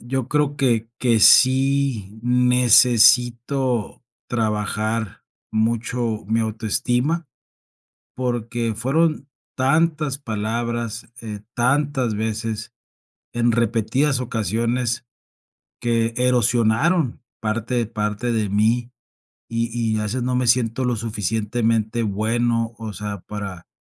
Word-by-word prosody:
yo 125 +1 -3
creo 145 +1 0
que 115 -5 +1
que 120 -3 +2
sí 130 -4 +4
necesito 125 0 +3 0.3
trabajar 110 -1 -2 0.3
mucho 115 0 -1
mi 110 +2 +1
autoestima, 120 +8 -1 0.9
porque, 120 -2 -2
fueron 145 +5 0 0.3
tantas 150 +1 +1
palabras, 115 -1 -3
eh, 105 -3 -7
tantas 130 -2 +1
veces, 110 0 -3 0.6
en 120 0 +2
repetidas 115 +4 +1
ocasiones, 120 +1 -1 0.8
que 115 -1 0
erosionaron 125 - +2 0.2
parte 115 +2 -1
parte 105 +2 -2
de 110 -3 0
mí, 115 +4 +1 0.6
y 115 0 -1 0.3
y - - 0
a 105 - -2
veces 120 +4 -2
no 125 0 -1
me 125 -1 0
siento 120 +1 +2
lo 120 -2 0
suficientemente 110 +1 -1
bueno, 115 +2 0
o 110 -3 -6
sea, 105 -3 -5
para 100 -4 -6
115 Hz, 100 wpm, -22 LUFS, 110-125 Hz, 0.9 s, sí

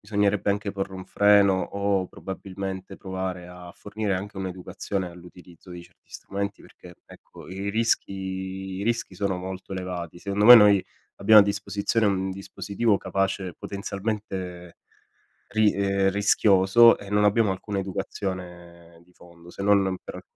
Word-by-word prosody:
bisognerebbe 105 -1 0
anche 100 0 -2
porre 95 -1 -4
un 95 0 -8
freno 100 -1 +4
o 100 -2 -1
probabilmente 95 0 -7
provare 95 -2 -5
a 90 -1 -11
fornire 105 -1 -3
anche 100 +2 -7
un'educazione 95 0 -4
all'utilizzo 90 0 -15
di 90 0 -8
certi - - -26
strumenti 100 0 -5
perché 90 0 -15
ecco, - - -15
i 95 +2 -4
rischi 115 -2 0 0.7
i - - -3
rischi 115 -3 -2
sono 100 0 -1
molto 95 +1 -7
elevati. 90 -3 -5
Secondo 100 +2 -1
me 120 +2 +12
noi 105 -3 +6 0.4
abbiamo 105 +2 +8
a - - +4
disposizione 100 +2 -1
un 95 -1 0
dispositivo 100 +2 -1
capace 95 -2 -2
potenzialmente 100 -3 -5 0.7
ri 110 -1 +3
ehm, 100 -1 +1
rischioso 100 +2 +5
e 100 - -11
non 105 0 +2
abbiamo 105 0 +3
alcuna 100 +2 -4
educazione 90 -3 -6
di 90 +1 -26
fondo, 85 -1 -16
se 100 - -6
non 100 -2 +3
per - - -9
95 Hz, 140 wpm, -25 LUFS, 95-100 Hz, 0.7 s, me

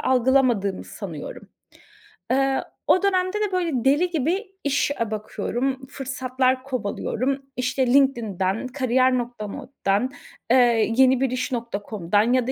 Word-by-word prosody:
algılamadığımı 250 -6 +2
sanıyorum. - - -8 0.8
Eee, 270 0 +2 0.2
o 370 - +4
dönemde 370 0 +1
de 415 -2 0
böyle 355 -3 0
deli 300 +7 +3
gibi 340 - 0 0.2
iş 285 0 +1
a 225 - -1
bakıyorum, 260 +5 -3
fırsatlar 260 -1 -1
kovalıyorum. 255 +1 -2 0.2
İşte 255 +1 0
LinkedIn'den, 225 -6 +1
kariyer.org'dan, 255 -2 0 0.4
eee, 235 -3 +4
yenibiris.com'dan 235 -6 +1
ya 255 -2 +2
da 260 - 0
255 Hz, 100 wpm, -23 LUFS, 235-270 Hz, 0.8 s, o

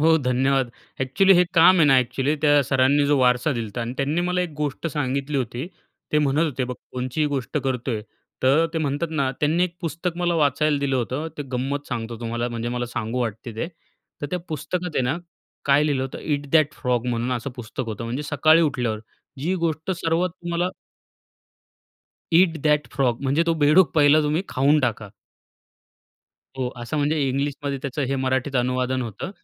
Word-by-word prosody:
हो, 160 +1 +5
धन्यवाद. 130 -1 +1 0.3
एक्चुअली 135 +10 +4
हे 180 0 +5
काम 170 +2 +7
आहे 165 - +6
ना 135 -2 +6
एक्चुअली 135 +3 0
त्या 145 -1 +5
सरांनी 135 +2 +3
जो 145 0 +3
वारसा 125 +3 +3
दिला 115 -3 -3
होता 105 +3 -6
आणि 115 +1 -3
त्यांनी 145 +5 0
मला 180 +1 0
एक 180 - -2
गोष्ट 150 +1 -3
सांगितली 140 -1 -2
होती. 125 +2 -3 0.5
ते 150 - +4
म्हणत 150 +2 +2
होते, 135 -5 -2
"बघ 125 0 -5 0.2
कोणचीही 130 +4 -1
गोष्ट 140 0 -3
करतोय," 125 -4 -2 0.4
तर 145 +6 +4
ते 165 - -1
म्हणतात 145 +2 -1
ना, 140 -4 0
त्यांनी 160 +4 +3
एक 175 -1 -6
पुस्तक 170 +1 -3
मला 175 -1 0
वाचायला 150 -1 +2
दिलं 135 -2 0
होतं, 130 +6 -2
ते - - -2
गंमत 135 +3 -2
सांगतो 115 -1 -4
तुम्हाला, 120 +1 -2
म्हणजे 120 0 -4
मला 120 0 -2
सांगू 115 +1 -3
वाटते 115 0 -4
ते. 140 - -2 0.6
तर - - -1
त्या 180 - -1
पुस्तकात 165 +3 -3
आहे - - +2
ना, 130 +5 0 0.5
काय 140 +1 +4
लिहिलं 140 -3 0
होतं, 130 - -5
Eat 145 -2 -2
That 155 -2 +4
Frog 125 -2 0
म्हणून 120 +1 -1
असं 125 +2 -3
पुस्तक 120 -2 -5
होतं, 110 0 -5
म्हणजे 120 +5 -3
सकाळी 155 +3 +4
उठल्यावर 120 -7 0 0.4
जी 175 +6 0
गोष्ट 160 +2 -2
सर्वात 170 +2 +1
तुम्हाला 175 0 -2 1.7
Eat 170 -2 +4
That 150 -1 +2
Frog, 125 -4 +1
म्हणजे 140 +4 +2
तो 165 - +3
बेडूक 155 +4 +5
पहिला 150 0 +6
तुम्ही 150 +4 0
खाऊन 140 +4 +3
टाका. 115 -4 -1 1.5
हो, 125 -1 0
असं, 120 +6 -4
म्हणजे 150 +2 +1
इंग्लिशमध्ये 140 +1 -2
त्याचं 140 +2 -3
हे 135 - 0
मराठीत 130 +1 0
अनुवादन 125 +1 0
होतं. 115 - -6
140 Hz, 180 wpm, -23 LUFS, 125-155 Hz, 1.7 s, काम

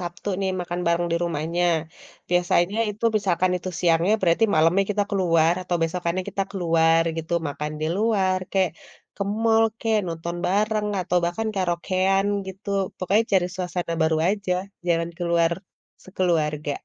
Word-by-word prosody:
Sabtu 175 +3 -6
nih 190 - 0
makan 175 0 -4
bareng 170 +1 +2
di - - +2
rumahnya. 170 +2 -1 0.7
Biasanya 175 +3 +2
itu 210 +3 -6
misalkan 185 -2 +1
itu 185 - -6
siangnya, 170 +3 +3
berarti 175 +5 +3
malemnya 165 +5 +4
kita 205 0 +1
ke - - -2
luar 165 -1 +3
atau 175 -1 -1
besokannya 170 +2 -1
kita 195 0 -1
ke - - -15
luar 165 0 +4
gitu. 165 +1 -5 0.2
Makan 150 +2 -4
di 155 - 0
luar 195 -4 +2
kayak, 190 -3 +2 0.5
ke - - -2 0.2
mall 225 0 +5 0.2
kek, 225 -1 +1
nonton 170 +1 -4
bareng 210 +2 +1
atau 180 0 -1
bahkan 220 +6 -2
karaokean 185 +2 +1 0.2
gitu, 195 +2 -9 0.3
pokoknya 195 +4 +2
cari 180 -2 +4
suasana 180 -2 -3
baru 160 0 +2
aja, 200 -2 -1 0.3
jalan 170 -1 +1
ke - - -4
luar 170 0 +3 0.5
sekeluarga. 155 -6 -1
175 Hz, 155 wpm, -24 LUFS, 170-195 Hz, 0.7 s, mall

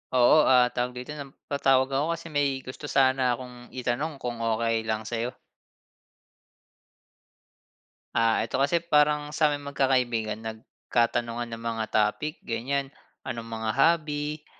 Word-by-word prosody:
Oo, 130 +5 +6
ah, 125 -1 +5
tawag 125 0 -2
dito 125 +3 -7
na 145 -2 -6 0.2
patawag 135 -1 +3
ako 150 +5 +1
kasi 165 0 -10
may 140 -3 0
gusto 130 +3 -8
sana 130 -2 +3
akong 125 0 -11
itanong 130 +5 -2
kung 120 -2 -3
okey 115 0 0
lang 110 0 -1
sayo? 120 +3 -3 2.8
Ah, 115 -1 +3
ito - - -5
kasi 140 +6 +2
parang 150 -2 +2
saming 145 -2 +1
magkakaibigan 120 -6 +1
nagkatanungan 115 +1 -2
ng 115 0 -6
mga 115 -1 -2
topic 110 +8 0
ganyan, 135 +5 -1 0.4
anong 115 -3 -5
mga 110 -1 -3
hobby. 150 0 +1
130 Hz, 125 wpm, -27 LUFS, 115-145 Hz, 2.8 s, Oo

